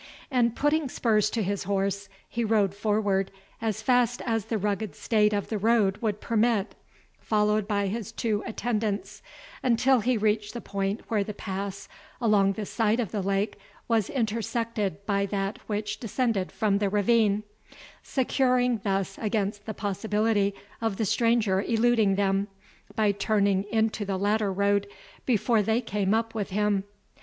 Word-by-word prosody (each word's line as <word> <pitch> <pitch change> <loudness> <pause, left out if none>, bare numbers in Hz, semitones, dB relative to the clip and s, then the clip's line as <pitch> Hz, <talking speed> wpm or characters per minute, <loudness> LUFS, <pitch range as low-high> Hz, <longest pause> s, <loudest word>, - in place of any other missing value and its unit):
And 235 -3 +2
putting 295 0 +1
spurs 215 -4 +2
to 225 0 -1
his 200 0 -2
horse, 200 0 -1 0.2
he 235 - -2
rode 210 -3 +2
forward 205 -2 0 0.3
as 220 -3 -2
fast 245 -1 +3
as 225 -4 0
the 225 0 -1
rugged 205 -3 -2
state 210 -2 +2
of 205 -1 -2
the 215 - -2
road 210 -2 +3
would 210 -2 -1
permit, 225 -2 +1 0.5
followed 210 -1 +1
by 200 -2 0
his 210 +1 -3
two 215 -3 -1
attendants, 215 -3 -2 0.4
until 255 +1 +3
he 245 +2 +1
reached 210 +1 0
the - - -3
point 200 -1 -2
where 215 -3 +1
the 210 +1 -6
pass 195 0 -5 0.3
along 205 -4 +3
the 210 +1 -4
side 225 +2 +1
of 225 -6 -2
the 210 - -1
lake 195 +2 -1 0.3
was 225 -4 +1
intersected 225 -4 -2
by 200 -1 +1
that 195 0 -2
which 210 0 -3
descended 225 -4 -1
from 205 -3 +1
the 205 -1 +1
ravine, 210 0 +2 0.6
securing 250 -2 +1
thus 195 -1 -1
against 205 -1 -1
the 220 - -3
possibility 205 0 0 0.3
of 225 -4 -1
the 220 - 0
stranger 225 -3 +2
eluding 225 -2 +2
them, 195 0 +1 0.5
by 215 -2 +3
turning 200 -1 +1
into 220 0 0
the 195 -1 -2
latter 205 +1 +1
road 200 +1 +1 0.4
before 225 -2 +3
they 220 +3 +1
came 200 -5 -1
up 225 0 -1
with 210 -3 -3
him. 205 0 +1
210 Hz, 155 wpm, -27 LUFS, 200-225 Hz, 0.6 s, fast